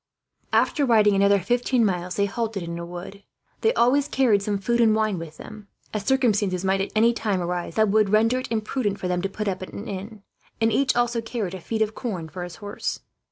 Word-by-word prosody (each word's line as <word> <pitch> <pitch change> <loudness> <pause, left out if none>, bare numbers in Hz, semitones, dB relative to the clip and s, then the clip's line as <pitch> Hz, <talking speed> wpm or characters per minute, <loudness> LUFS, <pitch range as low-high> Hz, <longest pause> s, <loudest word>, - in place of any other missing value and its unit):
After 295 - +2
riding 215 -5 +4
another 200 +1 +4
fifteen 240 +4 +1
miles, 180 -2 -2
they 200 - +2
halted 215 -2 -3
in 170 0 -5
a 170 - -5
wood. 180 +3 -8 0.4
They 445 - +4
always 270 +4 +3
carried 245 -8 +3
some 205 0 -1
food 235 +5 +1
and 220 -2 +5
wine 215 -4 0
with 160 -2 -9
them, 215 -1 -11 0.3
as 210 -2 -3
circumstances 205 -8 +1
might 190 0 +2
at 195 - -3
any 230 +2 +4
time 210 -5 -1
arise 175 -1 -3
that 215 -1 +3
would 210 0 +3
render 225 +4 +3
it 255 - -7
imprudent 215 -1 -1
for 185 - -3
them 180 0 0
to 195 - -2
put 210 +2 -4
up 190 -1 -2
at 185 - -8
an 210 - -7
inn; 200 +2 -7 0.4
and 225 0 +2
each 260 +4 +2
also 240 -1 +1
carried 225 -5 -4
a 190 - -7
feed 220 +4 0
of 215 0 -4
corn 185 -10 -5
for 180 +4 -7
his 175 -1 -8
horse. 205 -1 -5
210 Hz, 225 wpm, -24 LUFS, 190-230 Hz, 0.4 s, and